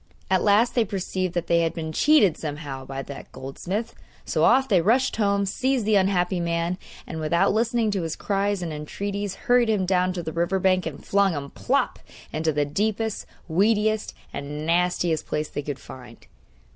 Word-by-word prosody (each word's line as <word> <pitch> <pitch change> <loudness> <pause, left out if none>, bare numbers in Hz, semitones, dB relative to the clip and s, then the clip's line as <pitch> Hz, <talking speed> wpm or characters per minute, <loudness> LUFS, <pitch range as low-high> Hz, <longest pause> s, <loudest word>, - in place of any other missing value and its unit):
At 190 - +4
last 210 +4 +4
they 240 - +3
perceived 185 -3 -3
that 175 -1 0
they 170 0 +3
had 165 -1 0
been 160 -2 -4
cheated 205 - +4
somehow 145 -4 -6
by 135 0 -5
that 140 0 -9
goldsmith. 180 - -4 0.3
So - - 0
off 265 +1 +5
they 190 -7 +4
rushed 240 +9 +2
home, 200 -2 +2
seized 255 +4 0
the 215 - +2
unhappy 185 -2 +2
man, 170 +1 -1 0.3
and, 160 - -6
without 160 +4 +2
listening 230 0 +1
to 195 -2 -1
his 165 -1 -3
cries 200 -1 -1
and 165 -2 -4
entreaties, 200 +6 -4
hurried 245 -3 +4
him 205 -4 +2
down 180 0 +2
to 175 -2 -4
the 160 - -5
river 170 +3 +1
bank 185 -2 +2
and 145 -3 -8
flung 200 -2 +3
him 140 -2 -5
plop! - - 0 0.3
into 160 +1 +1
the 145 -1 +1
deepest, 215 +7 -1 0.2
weediest, 210 +5 +1 0.2
and 150 +2 -5
nastiest 175 -1 +1
place 150 0 -2
they - - -4
could 145 -1 -5
find. 125 -3 -12
185 Hz, 185 wpm, -24 LUFS, 160-205 Hz, 0.3 s, off